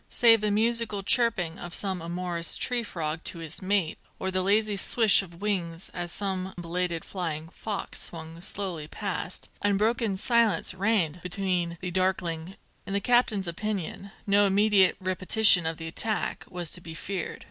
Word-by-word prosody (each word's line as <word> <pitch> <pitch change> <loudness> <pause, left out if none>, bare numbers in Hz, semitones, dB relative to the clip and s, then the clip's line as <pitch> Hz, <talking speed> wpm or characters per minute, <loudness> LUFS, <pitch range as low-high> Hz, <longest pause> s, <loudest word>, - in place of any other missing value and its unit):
Save 225 -2 +6
the 210 - +1
musical 220 -1 +2
chirping 195 -8 +2
of 175 0 -6
some 190 -3 -1
amorous 170 0 -1
tree 245 -1 +1
frog 165 -6 -4
to - - 0
his 165 -1 -4
mate, 190 -4 0 0.2
or 190 - -2
the 185 0 +1
lazy 210 +2 +2
swish 215 +2 +5
of 175 0 -12
wings 175 -4 -2
as 175 -1 -4
some 190 -1 -3
belated 170 0 -2
flying 165 -4 -4
fox 205 +2 -5
swung 165 0 -5
slowly 180 -5 -4
past, 185 0 -5
unbroken 210 +1 +1
silence 225 -5 +2
reigned 185 -4 +1
between 180 -2 -2
the 180 - -4
darkling 180 -3 -1
cliffs. 190 +3 -13 0.3
In 195 - -4
the 200 - +2
captain's 215 -4 +2
opinion, 200 +1 -4 0.2
no 205 0 +4
immediate 200 -1 +4
repetition 185 -1 +4
of 165 -1 -2
the 165 - -7
recent 160 - -3
attack 220 -2 -1
was 175 -3 -3
to 180 - -2
be 160 -1 -9
feared. 185 +1 -4
185 Hz, 165 wpm, -27 LUFS, 170-205 Hz, 0.3 s, Save